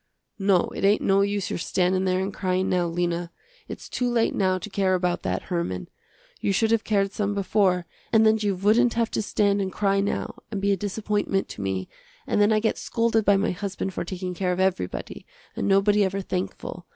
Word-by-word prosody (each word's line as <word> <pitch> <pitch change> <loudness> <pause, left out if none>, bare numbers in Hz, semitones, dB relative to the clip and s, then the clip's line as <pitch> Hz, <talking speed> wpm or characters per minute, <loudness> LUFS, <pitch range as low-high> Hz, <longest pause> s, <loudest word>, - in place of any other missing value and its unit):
"No, 195 -2 +3
it - - -5
ain't 205 +2 +3
no 195 0 +3
use 200 -1 -1
your - - -2
standin' 185 +2 +1
there 185 0 +1
and 195 +1 -3
cryin', 185 0 0
now, 180 -1 +1
Lena. 170 0 -2 0.4
Its - - -8
too 250 -1 -1
late 235 -1 +1
now 185 -1 +1
to 185 - -7
care 195 -2 +1
about 180 -1 0
that - - -2
Herman. 130 - -3 0.5
You - - 0
should 220 +3 +2
have 230 -1 +2
cared 200 -2 +1
some 205 0 -2
before, 190 -3 +1 0.3
and 220 -1 +5
then 220 0 +4
you 205 -2 0
wouldn't 220 +6 +3
have 230 -1 0
to - - 0
stand 205 -1 +1
and 190 -1 -2
cry 195 0 +1
now, 200 +1 -2
and 210 -3 -3
be 200 +1 +1
a - - +3
disappointment 205 0 -1
to - - -7
me, 95 -1 -2 0.4
and - - +1
then 205 +1 +4
I 215 - +4
get 220 +1 0
scolded 230 -1 +1
by 200 -1 +5
my 200 - +1
husband 195 0 -4
for - - -3
taking 180 +1 -5
care 180 0 -1
of 180 - -2
everybody, 185 - -2 0.3
and - - -2
nobody 200 +1 +4
ever 195 0 -1
thankful. 180 -1 -5
195 Hz, 210 wpm, -25 LUFS, 185-205 Hz, 0.5 s, and